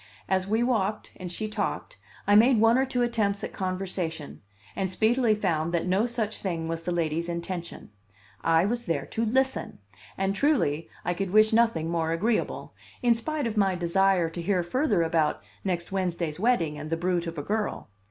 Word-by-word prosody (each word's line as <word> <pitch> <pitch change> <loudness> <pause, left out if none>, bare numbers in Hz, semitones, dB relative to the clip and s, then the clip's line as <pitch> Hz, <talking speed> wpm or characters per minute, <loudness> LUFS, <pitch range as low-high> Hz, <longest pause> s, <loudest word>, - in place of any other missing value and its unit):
As 190 0 0
we 220 +3 +2
walked 215 -4 0
and 180 -1 -6
she 215 +4 -3
talked, 210 - -3 0.3
I 205 - +3
made 230 +3 +6
one 225 +1 +5
or 265 +1 +3
two 250 -2 0
attempts 215 -4 0
at - - -5
conversation, 185 -5 -3 0.3
and 190 -1 -1
speedily 220 +4 +2
found 170 -5 0
that 170 - 0
no 190 +6 +2
such 220 -3 -2
thing 165 -4 -2
was 165 0 -3
the 175 - -3
lady's 170 0 -1
intention: 170 - -5 0.5
I 165 +1 +4
was 240 +3 -2
there 155 -5 -1
to 225 - -2
listen; 265 +4 0 0.4
and 195 0 0
truly 200 - +1 0.2
I 175 - +1
could 195 +1 -3
wish 215 +3 +5
nothing 220 -9 +2
more 165 -1 0
agreeable, 215 +7 -1 0.3
in 240 -1 +5
spite 290 +5 -3
of 225 -2 -3
my 195 -2 +3
desire 180 0 +2
to 165 +1 -6
hear 180 0 +1
further 255 - +1
about 160 -2 +1 0.2
next 180 -1 -2
Wednesday's 175 -4 -2
wedding 175 -10 +1
and 155 +1 -6
the 165 - 0
brute 175 0 0
of 165 0 -6
a 145 - -3
girl. 210 +5 -2
190 Hz, 185 wpm, -27 LUFS, 170-220 Hz, 0.5 s, made